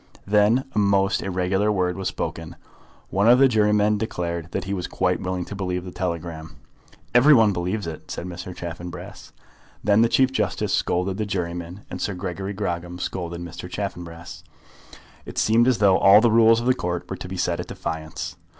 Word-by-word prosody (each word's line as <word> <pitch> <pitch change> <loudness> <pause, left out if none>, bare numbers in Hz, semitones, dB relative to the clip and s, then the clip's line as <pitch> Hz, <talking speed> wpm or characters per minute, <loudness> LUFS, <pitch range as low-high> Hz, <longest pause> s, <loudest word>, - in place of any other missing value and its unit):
Then 105 +5 +3
a 105 - +1
most 100 -1 +2
irregular 95 +2 0
word 90 -3 0
was 95 -1 -3
spoken. 80 +1 -5 0.6
One 100 +4 +3
of 125 - +8
the 135 +1 +6
jurymen 105 -2 +2
declared 85 -5 -3
that - - -3
he 100 - -4
was 90 -2 -3
quite 90 -1 0
willing 90 -1 -3
to 105 - -7
believe 90 -2 -3
the 90 - -7
telegram. 85 -3 -5 0.6
"Every 135 +5 +7
one 110 -4 +5
believes 90 +3 -2
it," 80 -2 -8
said - - -5
Mr. 90 0 -7
Chaffanbrass. 85 +2 -8 0.5
Then 105 +1 +4
the 115 - +4
Chief 130 +1 +3
Justice 105 -7 -1
scolded 95 +2 0
the 110 - -1
juryman, 90 -1 -4
and - - -5
Sir 100 - -2
Gregory 95 +2 -4
Grogram 90 -3 -3
scolded 85 -1 -4
Mr. 85 +1 -8
Chaffanbrass. 85 -5 -6 0.8
It - - -9
seemed 115 +2 +4
as 130 -3 +3
though 100 -2 +4
all 100 +2 +8
the 115 0 +3
rules 115 0 +6
of 120 - -4
the 130 - +4
Court 90 -7 -3
were - - -5
to - - -7
be 95 - -5
set 85 -1 0
at 90 - -5
defiance. 80 -1 -5
95 Hz, 185 wpm, -23 LUFS, 85-105 Hz, 0.8 s, of